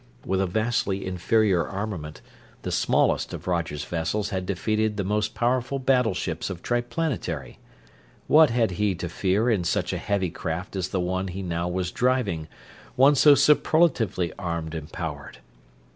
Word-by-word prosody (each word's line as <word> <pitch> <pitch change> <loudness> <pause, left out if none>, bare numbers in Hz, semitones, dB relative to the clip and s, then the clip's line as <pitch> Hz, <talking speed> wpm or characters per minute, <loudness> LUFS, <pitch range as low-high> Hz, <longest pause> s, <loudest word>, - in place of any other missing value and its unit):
With 95 0 0
a 95 - +1
vastly 110 -1 -1
inferior 95 0 +2
armament 95 -7 -5 0.4
the - - -3
smallest - - +1
of - - -10
Roger's 85 -5 -2
vessels 90 +5 -2
had 95 -2 -3
defeated 110 +2 0
the 100 - 0
most 105 +3 -1
powerful 125 +2 0
battleships 115 -12 0
of 90 -2 -7
Triplanetary; 120 - -2 0.7
what 155 -1 +6
had 115 -3 +1
he 100 +1 0
to 85 0 -4
fear 95 +6 0
in 105 -7 +2
such 85 - -1
a - - -2
heavy 100 -4 -1
craft 80 +6 -5
as 95 -1 -1
the 95 - -1
one 95 +2 -1
he 95 +2 -5
now 85 -1 -2
was 90 0 -2
driving, 120 -12 0 0.5
one 135 +3 +6
so 145 +1 +7
superlatively 140 - +3
armed 85 -4 -3
and 80 -2 -6
powered? 75 -4 -6
95 Hz, 155 wpm, -25 LUFS, 85-115 Hz, 0.7 s, so